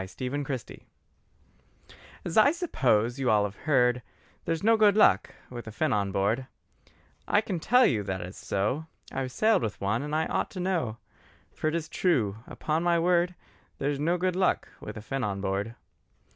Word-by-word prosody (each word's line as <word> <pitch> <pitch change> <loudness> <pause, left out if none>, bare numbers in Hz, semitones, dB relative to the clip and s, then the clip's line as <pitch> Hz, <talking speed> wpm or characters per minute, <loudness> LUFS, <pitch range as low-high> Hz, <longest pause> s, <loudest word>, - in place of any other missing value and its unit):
THE 125 - -3
WIZARD 140 -3 -3
FINN - - -12 1.5
As 170 - -4
I 220 +6 +6
suppose, 125 - +1
you 130 -2 +1
all 105 -1 +4
have 100 -1 -3
heard 125 -3 +3 0.4
There's 165 +1 -1
no 225 +2 +5
good 210 -2 +4
luck 100 - +4 0.2
with 120 -2 -7
a - - -6
Finn 155 +8 0
on 100 -1 0
board, 110 +7 0 0.8
I 205 - +4
can 195 -5 -3
tell 250 +9 +5
you 110 - +2
that 95 -2 -3
is 90 +2 -7
so. 115 +11 -2 0.2
I've 130 -1 -3
sailed 215 - +3
with 105 - -3
one 100 +5 0
and 150 +1 -3
I 160 +1 +1
ought - - -1
to - - -3
know: 175 - -1 0.6
For - - -2
it 155 - 0
is 165 -2 -2
true, 130 - +1
upon 155 +1 -2
my 175 0 +3
word, 175 +1 +2 0.4
There's 140 0 -1
no 170 +4 +1
good 180 0 0
luck 185 0 +1
with - - -8
a 105 - -8
Finn 135 +3 -3
on 100 -3 -2
board. 100 +4 -2
135 Hz, 185 wpm, -28 LUFS, 110-175 Hz, 1.5 s, I